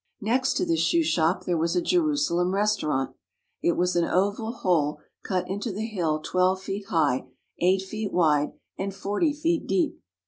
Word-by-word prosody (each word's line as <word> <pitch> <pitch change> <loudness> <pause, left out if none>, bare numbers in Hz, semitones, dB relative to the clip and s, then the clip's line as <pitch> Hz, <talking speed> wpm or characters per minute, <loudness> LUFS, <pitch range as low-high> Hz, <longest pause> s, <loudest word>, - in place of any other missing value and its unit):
Next 255 +5 +1
to 365 - +1
this 335 -1 +1
shoe 335 -1 +3
shop 180 - +1
there 175 -2 0
was 165 +2 0
a - - +4
Jerusalem 290 - +1
restau 205 -5 +1
rant. 135 -2 -1 0.5
It 170 - +2
was 180 +1 0
an 175 - +3
oval 205 +6 0
hole 170 -10 +1 0.3
cut 185 -2 -1
into 205 +4 -3
the 210 +3 -3
hill 170 -8 -1
twelve 185 +1 +2
feet 200 0 -5
high, 145 -8 +1 0.3
eight 185 +2 +3
feet 210 +1 -4
wide, 150 -4 +2 0.3
and 195 0 -3
forty 205 - 0
feet 325 +3 -1
deep. 345 -3 0
190 Hz, 175 wpm, -26 LUFS, 175-230 Hz, 0.5 s, a